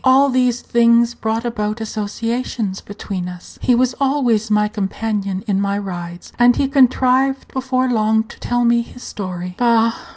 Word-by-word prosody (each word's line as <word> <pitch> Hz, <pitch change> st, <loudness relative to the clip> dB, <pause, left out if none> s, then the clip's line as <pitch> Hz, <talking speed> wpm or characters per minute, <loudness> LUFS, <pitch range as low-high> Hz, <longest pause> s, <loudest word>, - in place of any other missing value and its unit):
All 270 Hz, +2 st, +5 dB
these 250 Hz, -1 st, +1 dB
things 235 Hz, 0 st, +3 dB
brought 225 Hz, 0 st, -2 dB
about 215 Hz, -2 st, -2 dB
associations 220 Hz, -1 st, -3 dB
between 195 Hz, -3 st, -6 dB
us; 180 Hz, -1 st, -12 dB
he 250 Hz, -, +3 dB
was 250 Hz, +1 st, +2 dB
always 250 Hz, -6 st, +1 dB
my 210 Hz, 0 st, +3 dB
companion 200 Hz, -2 st, -3 dB
in 200 Hz, -3 st, 0 dB
my 200 Hz, 0 st, 0 dB
rides; 175 Hz, -3 st, -7 dB
and 245 Hz, 0 st, +5 dB
he 275 Hz, -, +1 dB
contrived 265 Hz, 0 st, +2 dB
before 260 Hz, -1 st, 0 dB
long 220 Hz, -2 st, +2 dB
to 225 Hz, -, -15 dB
tell 245 Hz, 0 st, 0 dB
me 235 Hz, 0 st, +3 dB
his 245 Hz, +1 st, -11 dB
story. 180 Hz, -2 st, -6 dB
Bah! 230 Hz, -1 st, +3 dB
230 Hz, 160 wpm, -19 LUFS, 205-250 Hz, -, All